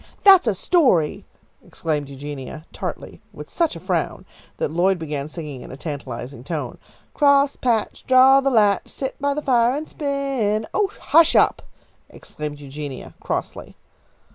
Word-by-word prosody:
"That's 385 -9 +7
a 215 - +2
story!" 190 - +2 0.4
exclaimed 150 -3 -3
Eugenia, 145 +2 -8
tartly, - - -6
with - - -11
such 335 - 0
a - - -7
frown 180 -1 -2 0.3
that - - -2
Lloyd 180 +3 +2
began 150 -3 -4
singing 150 -5 -8
in - - -10
a 130 - -9
tantalising 140 -4 -7
tone, 150 +1 -5 0.3
"Crosspatch, 280 -5 +2
draw 265 +1 +6
the 275 - +1
latch, 210 -6 +3
sit 265 0 -6
by 285 0 0
the 300 - -3
fire 245 -1 +3
and 305 +2 -4
spin." 275 -7 -1
"Oh, 410 -2 +1
hush 330 +1 +4
up!" - - +4 0.5
exclaimed 150 -1 -8
Eugenia, 140 -1 -8
crossly. - - -5
200 Hz, 140 wpm, -22 LUFS, -, 0.5 s, That's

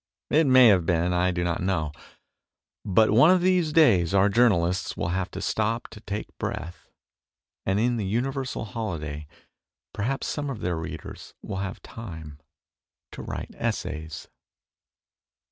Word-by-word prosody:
It 155 0 +4
may 130 -2 +8
have 95 -4 +4
been; 85 +1 +1
I 90 +1 +2
do 90 -1 -1
not 85 0 -1
know. 90 -5 -1 0.9
But 110 +3 +3
one 125 +9 +6
of 185 -1 +5
these 180 -3 +2
days 100 - +4
our 100 +1 +5
journalists 95 -5 +2
will 85 - -2
have 90 +1 -1
to 95 - -7
stop 110 +2 -1
to 115 - -11
take 105 -1 -6
breath, 85 +3 -5 0.8
and 95 +2 +2
in 120 +2 +1
the 105 - -2
universal 130 +3 -2
holiday 80 -10 -5 0.7
perhaps 130 +7 -2
some 145 -1 -3
of 130 -6 -5
their 90 -1 -1
readers 80 - -8
will 95 - -5
have 95 0 -5
time 80 -10 -9 0.7
to - - -8
write - - -6
essays. 80 0 -4
100 Hz, 145 wpm, -26 LUFS, 85-120 Hz, 0.9 s, may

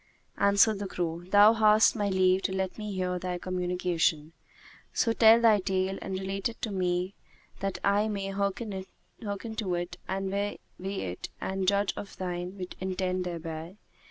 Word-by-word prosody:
Answered 200 +1 +4
the 200 - -3
crow, 170 -2 -3
"Thou 205 +3 +7
hast 215 -1 +5
my 205 -2 0
leave 185 0 +3
to 195 - -1
let 190 -1 -2
me 210 -1 -4
hear 180 -1 -1
thy 180 0 -3
communication; 180 -3 -1 0.6
so 230 - +1
tell 225 0 +7
thy 225 -3 +5
tale, 190 0 -1
and 190 -1 -3
relate 195 +2 -2
it 230 - -11
to 220 - -1
me 180 0 -1 0.5
that 195 -1 -2
I 205 +2 +3
may 200 -2 -3
hearken 200 +2 -2 0.5
to 210 -2 -3
it 175 +1 -4
and 190 0 -2
weigh 200 +1 -1 0.2
it 185 - -4
and 190 -1 -2
judge 200 0 +2
of 200 - -8
thine 180 +1 -4
intent 185 -1 -1
thereby." 165 +1 -6
190 Hz, 155 wpm, -29 LUFS, 180-205 Hz, 0.6 s, Thou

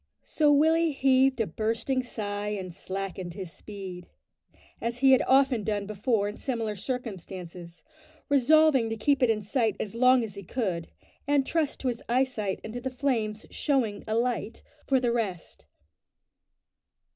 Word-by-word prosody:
So 300 -2 +2
Willie 320 +2 +4
heaved 265 -1 +3
a - - +2
bursting 225 +8 -1
sigh 205 -4 -4
and 190 -4 -4
slackened 190 -1 -5
his 185 -4 -6
speed 190 -4 -8 0.7
as 235 +1 -2
he 265 +1 +5
had 260 - +6
often 265 -4 +4
done 205 -1 -1
before 210 +1 0
in 205 - -6
similar 230 -5 -2
circumstances 185 -7 -7 0.4
resolving 285 -2 +4
to 225 - -3
keep 275 +5 +2
it 250 - +4
in 215 -2 +1
sight 225 +1 0
as 210 - -4
long 255 +1 +4
as 215 -3 -5
he 200 - -7
could, 185 -5 -3 0.4
and 285 -2 +3
trust 320 -2 -1
to 265 - -2
his 240 -2 -2
eyesight 240 -6 0
and 220 - -7
to 245 - -5
the 260 - -2
flames 240 -5 -1
"showing 245 -8 0
a 220 - -1
light" 235 -1 -1 0.2
for 265 -2 +3
the 245 -2 +1
rest. 205 -8 -4
230 Hz, 155 wpm, -27 LUFS, 205-260 Hz, 0.7 s, had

